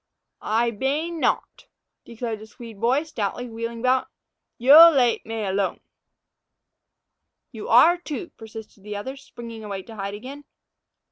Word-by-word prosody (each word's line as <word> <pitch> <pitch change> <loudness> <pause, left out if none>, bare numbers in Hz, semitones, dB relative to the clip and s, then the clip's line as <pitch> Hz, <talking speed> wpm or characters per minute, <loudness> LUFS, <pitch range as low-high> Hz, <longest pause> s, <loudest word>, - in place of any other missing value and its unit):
"Ay 230 +2 +1
bane 295 +9 -2
note," - - -1 0.4
declared 230 -2 -5
the 215 - -12
Swede 225 -2 -12
boy, 255 +6 +2
stoutly, 245 -4 -4
wheeling 230 0 -6
about; 255 +1 +2 0.5
"yo 295 +7 +9
late 255 -7 +2
may 225 -1 -3
alone." 195 0 -1 1.7
"You 220 -3 -8
are, 315 +10 +6
too," 340 0 -7
persisted 220 -2 -11
the 210 0 -6
other, 260 +7 -5
springing 230 -4 -10
away 200 -2 -5
to 225 - -12
hide 200 0 -5
again. 270 +7 -10
230 Hz, 135 wpm, -24 LUFS, 215-265 Hz, 1.7 s, yo